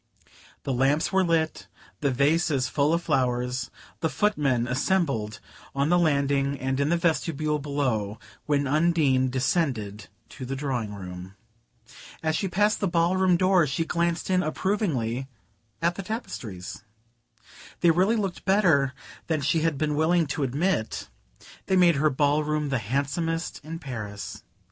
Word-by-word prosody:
The 135 - -1
lamps 135 +5 +2
were 190 0 +4
lit, 165 -2 0 0.3
the 140 - +1
vases 140 0 +2
full 145 +2 +1
of 170 +1 +1
flowers, 125 -3 0 0.3
the 160 - 0
foot 210 +5 +1
men 130 -5 +1
assembled 130 - 0 0.4
on 140 +2 +1
the 175 +1 +4
landing 140 -3 +1
and 135 +1 -1
in 140 +1 +1
the 170 - +3
vestibule 155 -3 0
below, 130 -8 -1 0.3
when 145 -1 +2
Undine 145 -3 +2
descended 125 - -1 0.2
to 130 - -9
the 130 +2 -3
drawing 125 -7 -3
room. 90 0 -8 0.9
As 160 0 +1
she 195 - 0
passed 205 +4 +2
the 200 - 0
ballroom 175 +1 +3
door 185 -3 +4
she 150 +4 -1
glanced 170 +2 -1
in 185 0 +3
approvingly 155 - -1 0.6
at 170 +1 +3
the 195 - -6
tapestries. 110 - -6 1.0
They 170 - +6
really 185 +7 +3
looked 195 -5 -3
better 160 -10 +3 0.3
than 160 -3 0
she 150 +4 +2
had 160 -3 0
been 150 +1 0
willing 165 +2 +3
to - - -3
admit: 140 0 -1 0.6
they 190 - +2
made 175 -4 +5
her 155 +2 +3
ballroom 150 +1 +1
the 135 -3 0
handsomest 145 +8 -2
in 160 +2 -6
Paris. 110 - -6
150 Hz, 145 wpm, -26 LUFS, 130-170 Hz, 1.0 s, They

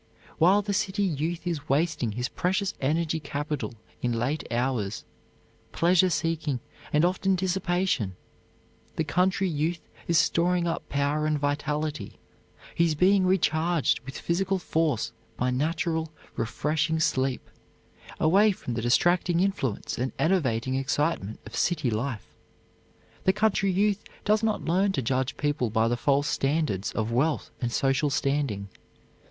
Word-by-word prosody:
While 190 +5 +5
the 200 0 -2
city 205 0 0
youth 170 0 -2
is 160 -4 -3
wasting 145 -5 +1
his 125 +3 -2
precious 190 +5 -1
energy 160 +3 0
capital 145 -3 -4 0.3
in 120 -1 0
late 135 +7 -1
hours, 120 -4 -1 0.7
pleasure 180 +2 +4
seeking, 160 -4 -1 0.3
and 150 +3 +4
often 190 +1 +1
dissipation, 180 - 0 0.8
the 160 - 0
country 185 +5 +1
youth 165 +1 -1 0.3
is 170 - +3
storing 175 +2 +2
up 165 - -3
power 145 +2 0
and 155 -1 +1
vitality; 145 -3 -2 0.6
he 170 - +3
is 160 -2 +1
being 185 +3 +4
recharged 170 -3 +2
with 135 +2 -9
physical 190 +3 0
force 160 - 0 0.3
by 125 +1 +1
natural, 160 +4 -1 0.3
refreshing 155 +7 0
sleep, 130 -4 0 0.7
away 200 +7 +5
from 125 -10 -5
the 115 - -2
distracting 175 +8 +3
influence 180 - -1
and 125 +1 -1
enervating 130 -8 +1
excitement 135 - -1
of 105 - -9
city 155 -8 +1
life. 110 +1 -3 1.0
The 190 - +5
country 210 -2 +2
youth 200 +2 +1 0.2
does 215 +1 +3
not 220 -2 0
learn 190 +4 +2
to 135 - -1
judge 130 +3 -1
people 145 -5 0
by 110 +1 +2
the 120 - +1
false 140 +3 +1
standards 135 - 0
of 110 0 -1
wealth 145 +6 0
and 120 -1 -1
social 135 +4 +1
standing. 135 -8 -1
155 Hz, 135 wpm, -27 LUFS, 130-180 Hz, 1.0 s, While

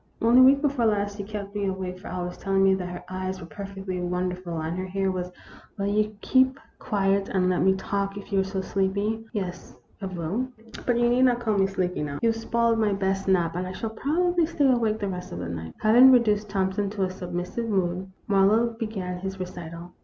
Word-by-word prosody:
Only 235 +3 +6
week 275 +2 +6
before 270 -5 +2
last 205 -1 0
you 200 - -4
kept 200 -1 -6
me 205 -1 -1
awake 185 -1 -4
for 195 - -10
hours 180 0 -4
telling 195 0 +1
me 195 0 +5
that 185 -2 -2
her 180 0 -7
eyes 185 0 -4
were 175 - -8
perfectly 195 +1 -6
wonderful 180 -1 -2
and 160 +2 -3
her 185 +1 -3
hair 195 0 0
was 180 -1 -3 0.2
" - - -22
Will 200 - -1
you 210 +1 0
keep 260 +1 +3 0.2
quiet 195 -1 +1
and 185 -1 +2
let 180 - +1
me 190 0 +4
talk, 200 +1 -2
if 200 0 -9
you 195 - +3
are - - +3
so 190 0 -3
sleepy? 200 +4 -1
" - - -32
"Yes, 185 -5 -5 0.2
I 195 - -3
will. 185 +7 -2 0.4
But 245 -1 +3
you 240 0 +3
need 250 +2 +4
not 245 -1 +3
call 220 -3 0
me 195 -1 +3
sleepy 185 -3 -2
now. 145 -1 -3
You 230 - +5
've - - -4
spoiled 230 0 +1
my 210 -2 +2
best 195 0 -1
nap 175 -3 +2
and 180 +1 -2
I 185 - -5
shall 220 +3 -4
prob 330 +10 0
ably 340 -3 +2
stay 300 -3 +1
awake 230 -4 +2
the 205 -2 -3
rest 180 -1 -5
of - - -5
the 85 - -4
night." 80 -1 -6
Having 240 +5 +8
reduced 210 -4 +3
Thompson 195 0 0
to 200 -1 -2
a 185 - 0
submissive 180 +5 -4
mood, 185 -2 0 0.2
Marlowe 210 +4 +4
began 190 -6 -4
his 190 +1 -5
recital. 175 -1 -7
195 Hz, 230 wpm, -26 LUFS, 185-220 Hz, 0.4 s, Having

